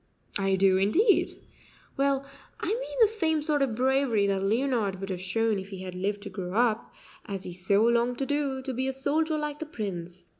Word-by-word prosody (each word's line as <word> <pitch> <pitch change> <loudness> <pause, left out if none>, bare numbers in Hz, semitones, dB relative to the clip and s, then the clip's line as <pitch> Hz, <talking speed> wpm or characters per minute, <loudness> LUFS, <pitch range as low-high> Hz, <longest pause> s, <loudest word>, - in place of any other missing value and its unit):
"I 195 -1 +2
do, 190 0 +4
indeed." 355 - +3 0.6
"Well, 275 0 +1 0.3
I - - -4
mean - - -3
the 445 - +8
same 325 -8 0
sort 295 -1 +1
of 260 -5 +1
bravery 260 -4 +2
that 195 -1 +1
Leonard 220 -2 0
would 195 0 -4
have 180 -1 -4
shown 215 +3 0
if 190 +1 -8
he 190 -2 -7
had 185 -1 -6
lived 200 +2 -2
to 200 - -6
grow 185 -1 -5
up, 230 0 +1 0.4
as 195 -2 -4
he 180 - -6
so 195 +4 +2
longed 235 +1 +2
to 270 - -1
do, 280 -2 -1
to 265 -1 -3
be 260 +2 -1
a 265 - -1
soldier 305 +4 0
like 300 -1 -3
the 315 - -5
Prince. 180 - -5
230 Hz, 210 wpm, -28 LUFS, 195-280 Hz, 0.6 s, the